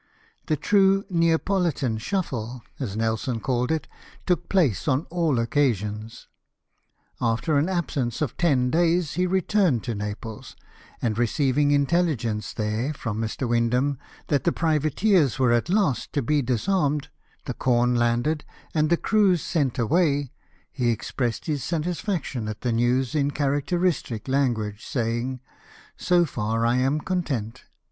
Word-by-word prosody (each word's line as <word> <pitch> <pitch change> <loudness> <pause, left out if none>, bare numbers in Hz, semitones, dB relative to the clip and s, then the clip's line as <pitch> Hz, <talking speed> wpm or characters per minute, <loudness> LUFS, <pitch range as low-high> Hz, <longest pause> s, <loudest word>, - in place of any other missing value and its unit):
The 155 - +1
true 195 +4 +3
Neapolitan 165 - +1
shufHe, 125 - -3 0.2
as 110 -7 -4
Nelson 115 +2 -1
called 125 +2 -1
it, 160 -2 -1 0.4
took 175 -1 0
place 155 - +2
on 140 +3 +1
all 165 -6 +1
occasions. 115 -4 -1 0.9
After 115 +6 +1
an 155 +6 0
absence 140 - -1
of 150 -7 -2
ten 130 -7 +2
days 170 -1 +2
he 180 +3 +1
returned 185 - +2
to 120 - -3
Naples; 105 +1 -6 0.5
and 115 -2 0
receiving 135 +4 +2
intelligence 140 -7 +1
there, 110 +7 -2
from 115 -4 -3
Mr. 115 +3 -2
Windham, 125 +4 +1 0.3
that 145 -3 +2
the 170 - +2
privateers 155 - +2
were 130 -2 +3
at 120 +7 +1
last 180 - +1
to 145 - 0
be 150 +4 +2
disarmed, 145 - 0 0.4
the - - -3
corn 125 -1 +2
landed, 120 +6 +1 0.3
and 155 -1 +2
the 170 - +3
crews 195 -6 +2
sent 145 -8 0
away, 145 +1 +1 0.4
he 125 -3 0
expressed 120 +1 -2
his 145 -5 -2
satisfaction 165 - -2
at 110 -1 -6
the 125 - 0
news 120 +2 +1
in 145 -2 +1
characteristic 145 - -1
language, 120 -6 0
saying, 120 -1 -2 0.3
" - - -22
So 175 -1 +3
far 115 -4 -1
I 120 +2 +2
am 135 +4 +1
content. 130 - -3
135 Hz, 140 wpm, -25 LUFS, 120-165 Hz, 0.9 s, true